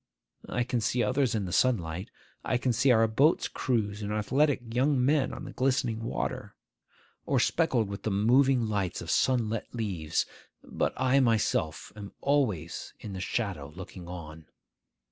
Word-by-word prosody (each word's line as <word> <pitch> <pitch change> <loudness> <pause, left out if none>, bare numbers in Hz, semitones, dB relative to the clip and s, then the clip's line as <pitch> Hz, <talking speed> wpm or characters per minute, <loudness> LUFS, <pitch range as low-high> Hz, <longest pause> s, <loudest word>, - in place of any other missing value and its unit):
I 120 - 0
can 120 -1 -1
see 120 +3 +1
others 130 -3 +1
in 105 -3 -1
the 90 - -5
sunlight; 95 -4 +1 0.3
I 125 - +1
can 125 0 0
see 115 +4 +2
our 115 -2 +5
boats' 140 +9 +3
crews 105 -4 -1
and 105 0 -3
our 105 - 0
athletic 130 +1 +1
young 130 +1 +2
men 145 -1 +2
on - - -7
the - - -7
glistening 125 -4 0
water, - - -3 0.7
or - - +2
speckled 130 - +2
with 100 0 -6
the - - -2
moving 120 +5 +3
lights 100 -5 -2
of - - -4
sunlit 115 -4 +1
leaves; 90 -9 -1 0.4
but - - -1
I 130 +1 +3
myself 110 - +1
am 100 -2 -9
always 110 - -1
in 105 - -7
the 95 - -5
shadow 95 -9 -2
looking 90 -1 -9
on. 80 -3 -9
115 Hz, 165 wpm, -29 LUFS, 100-130 Hz, 0.7 s, our